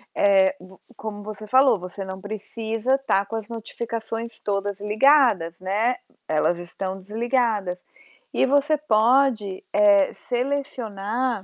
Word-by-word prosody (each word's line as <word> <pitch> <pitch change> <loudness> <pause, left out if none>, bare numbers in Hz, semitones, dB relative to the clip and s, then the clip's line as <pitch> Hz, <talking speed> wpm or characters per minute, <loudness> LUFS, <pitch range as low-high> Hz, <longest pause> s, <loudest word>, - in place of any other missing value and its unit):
eh, 195 -1 +4
v 185 +1 -15 0.2
como 210 -1 -6
você 215 0 -8
falou, 260 -5 +4
você 180 +2 -7
não 190 0 -7
precisa 220 +4 -2
tá 200 -7 +1
com 225 - -5
as 220 -1 -4
notificações 230 0 -5
todas 200 -1 -2
ligadas, 210 - +3
né, 210 +7 0 0.3
elas 155 +3 +1
estão 185 +2 -5
desligadas. 215 -3 -1 0.5
E - - +3
você 285 +3 +3
pode, 230 -5 +2
eh, 300 -2 +5
selecionar 245 -4 -2
215 Hz, 120 wpm, -24 LUFS, 195-250 Hz, 0.5 s, eh